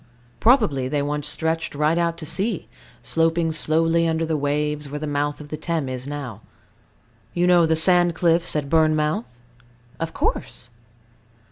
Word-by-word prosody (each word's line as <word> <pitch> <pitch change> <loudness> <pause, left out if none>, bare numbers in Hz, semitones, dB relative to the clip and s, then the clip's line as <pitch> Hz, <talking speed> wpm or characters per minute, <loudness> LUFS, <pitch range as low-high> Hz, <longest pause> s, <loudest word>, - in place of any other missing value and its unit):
Probably 210 - +3
they 145 +1 -1
once 145 0 -2
stretched 160 +1 -1
right 150 +2 +2
out 170 -1 0
to 165 - -6
sea, 190 +6 0 0.4
sloping 165 0 +1
slowly 165 +2 +1
under 165 0 0
the 160 0 -1
waves, 150 0 -1
where 145 - -5
the 155 - -4
mouth 145 0 -2
of 150 -1 -10
the 155 - -4
Thames 155 -4 -2
is 130 +1 -5
now. 135 -7 -6 0.9
You 175 0 +2
know 175 -2 +5
the 160 - +2
sand 175 +1 +3
cliffs 170 -1 +2
at 150 -2 -1
Bournemouth? 150 -6 +1 0.6
Of 165 0 -3
course. - - -3
155 Hz, 155 wpm, -22 LUFS, 145-165 Hz, 0.9 s, know